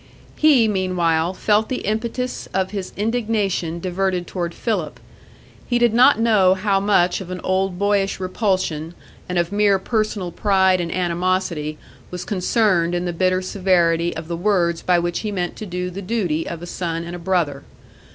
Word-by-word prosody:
He, 280 -7 +5
meanwhile, 180 -4 +1
felt 210 +3 +1
the 255 - -3
impetus 235 +4 -3
of 190 0 0
his 195 -3 -5
indignation 210 -6 -1
diverted 185 0 -1
toward 175 -2 -3
Philip. 190 -10 -2 0.7
He 240 - +1
did 240 -2 +3
not 250 +1 +6
know 205 -5 +4
how 195 0 +1
much 195 -2 +2
of 185 - -8
an 185 0 -5
old 190 -1 0
boyish 200 0 +1
repulsion 185 -4 -1 0.3
and 180 - -2
of 170 +1 0
mere 205 -1 +3
personal 210 -2 -2
pride 190 -1 +2
and 170 -1 -3
animosity 175 -3 -1 0.3
was 180 0 -6
concerned 185 -3 +1
in 175 0 -1
the 175 - -2
bitter 185 +2 +1
severity 175 -3 +1
of 160 0 -6
the 170 - -3
words 170 -2 +1
by 180 -1 +2
which 175 0 -1
he 215 - -3
meant 180 -3 -3
to 215 - -6
do 180 0 -3
the 195 +3 -6
duty 185 -6 -1
of 170 0 -6
a - - -4
son 170 -1 -3
and 170 +1 -6
a - - -7
brother. 170 -6 0
185 Hz, 170 wpm, -21 LUFS, 175-205 Hz, 0.7 s, not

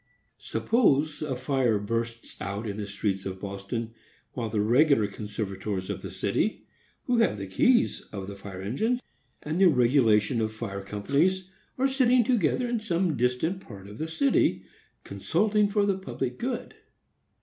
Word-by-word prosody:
Suppose 155 - +1
a 145 -4 -2
fire 130 -3 +1
bursts 115 +3 -3
out 100 +3 -4
in 100 -1 -4
the 105 -1 -4
streets 100 -1 -2
of 95 0 -6
Boston, 100 +4 -5 0.4
while 115 -3 -3
the 105 -1 -1
regular 120 +2 +4
conservators 100 -2 -4
of - - -5
the - - -6
city, - - -1 0.4
who 245 - +1
have 225 - +3
the 100 - -5
keys 235 - +3
of 100 -3 -5
the 100 +1 -7
fire 100 -1 -8
engines, 220 - 0 0.4
and 155 +4 -2
the 195 - +7
regulation 120 -4 +3
of 110 0 -2
fire 100 -3 -5
companies, 155 - 0 0.3
are 265 +1 +3
sitting 255 -2 +4
together 240 - +1
in 240 -1 0
some 180 -6 0
distant 125 +10 0
part 100 - -11
of 105 +2 -11
the 160 - -2
city, 270 +12 +2 0.4
consulting 210 -1 +1
for 205 0 +2
the 195 -1 0
public 130 -9 -4
good. 250 0 -3
125 Hz, 160 wpm, -27 LUFS, -, 0.4 s, the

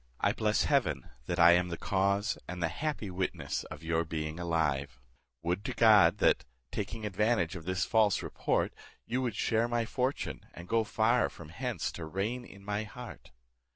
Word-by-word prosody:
I - - +2
bless - - +1
heaven - - +1 0.2
that 85 - -1
I 85 0 +8
am 90 +1 +4
the 85 -1 -4
cause, 100 +2 +1
and 90 0 -5
the 80 - +2
happy 115 - -3
witness 90 -5 -2
of - - -9
your 80 0 +1
being 80 0 -4
alive; 75 -6 0 0.4
would 90 +4 -1
to - - -3
God, 105 -5 +6
that, - - +3 0.3
taking 110 - -4
advantage 100 -3 +1
of 85 -3 -8
this 95 0 0
false 110 -3 +3
report, - - 0 0.3
you 125 +3 -1
would 120 -4 -1
share 115 +1 +1
my 120 -1 0
fortune, 130 +4 -2
and 85 +1 -9
go 115 +2 +2
far 115 +3 +2
from 80 -3 -12
hence 85 - -3
to 80 - -6
reign 105 +9 -2
in 100 -2 -14
my 105 +1 -1
heart! 120 +2 -10
95 Hz, 180 wpm, -31 LUFS, 85-110 Hz, 0.4 s, I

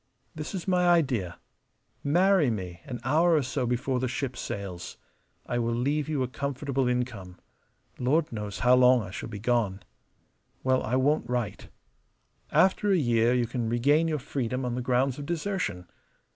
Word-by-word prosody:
This 155 +5 -6
is 185 - -5
my 180 -1 +3
idea: 130 - +2 0.7
marry 175 0 +4
me 90 -6 -4
an 125 -3 -6
hour 160 +6 +3
or 150 - +2
so 130 -1 -2
before 125 +2 0
the 130 - -1
ship 130 0 -3
sails. 95 -6 -6 0.5
I 120 - -1
will 115 0 0
leave 145 +5 0
you 145 -4 0
a - - -1
comfortable 135 0 -2
income. 120 -8 -3 0.6
Lord 150 +6 +1
knows 105 -4 -5
how 125 - +6
long 125 -1 +5
I 90 - -8
shall 110 - -6
be 105 - -6
gone. 110 -3 0 0.8
Well, 130 0 +2
I 120 - -1
won't 130 -1 +1
write. 120 -5 -3 0.8
After 195 +2 +3
a 190 - +4
year 120 -4 +2
you 120 -1 +2
can 115 -1 -3
regain 145 +8 +3
your 155 -2 0
freedom 125 -1 -3
on 125 - -2
the 125 - -2
grounds 125 +2 +1
of 145 - -6
desertion. 170 - -2
125 Hz, 170 wpm, -27 LUFS, 115-145 Hz, 0.8 s, how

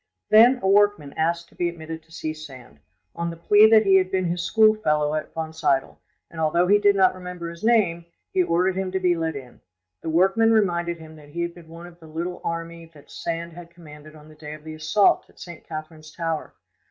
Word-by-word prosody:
Then 235 +4 +7
a - - +1
workman 200 -7 +2
asked 170 +1 -1
to - - -24
be 175 - -1
admitted 160 -1 -8
to 165 - -28
see 155 -1 -4
Sand, 130 - -13 0.4
on 170 0 -3
the 165 - -6
plea 205 +6 +5
that 220 -1 +5
he 190 -1 +6
had 185 -1 +1
been 185 -1 0
his 175 +1 -2
schoolfellow 175 -6 +2
at 155 - -4
Wonsiedel, 160 -4 -1 0.3
and 160 - -6
although 165 +3 +2
he 205 +3 +4
did 205 -1 +4
not 190 -1 +4
remember 180 -2 -7
his 170 +3 -13
name, 195 -8 +2 0.3
he 375 - +3
ordered 185 - +1
him 190 -1 -3
to 190 - 0
be 180 -2 +2
let 160 -2 -2
in: 130 -3 -11 0.4
the - - -5
workman 190 +7 +3
reminded 175 -5 +1
him 160 -1 -13
that 145 -1 -16
he 170 +3 -3
had 170 0 -4
been 170 -2 -15
one 165 +1 -11
of 175 -1 -15
the 160 - -14
little 170 +3 -5
army 165 0 -5
that 145 - -17
Sand 170 0 -5
had 170 0 -11
commanded 155 -3 -14
on 150 0 -15
the 155 - -15
day 150 0 -9
of 155 - -15
the 155 0 -8
assault 155 +7 +2
of - - -24
St. 175 -3 -11
Catherine's 155 0 -8
tower. 165 -2 -4
170 Hz, 225 wpm, -23 LUFS, 155-185 Hz, 0.4 s, Then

